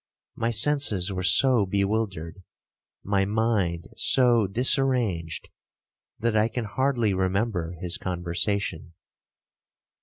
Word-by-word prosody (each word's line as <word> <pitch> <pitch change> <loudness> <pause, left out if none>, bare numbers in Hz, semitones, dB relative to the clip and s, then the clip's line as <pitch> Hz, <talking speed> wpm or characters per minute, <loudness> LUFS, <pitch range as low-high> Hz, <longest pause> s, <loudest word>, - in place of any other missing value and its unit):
My 115 - -1
senses 110 -6 +1
were 95 - -3
so 105 +4 +4
bewildered, 100 -4 -2 0.6
my 100 -1 +1
mind 100 -5 -1
so 120 -7 +3
disarranged, 115 - 0 0.7
that 115 0 -1
I 110 +1 +3
can 120 0 -4
hardly 120 -2 0
remember 95 -2 -1
his 90 -2 -3
conversation. 90 -1 -3
100 Hz, 95 wpm, -25 LUFS, 90-115 Hz, 0.7 s, so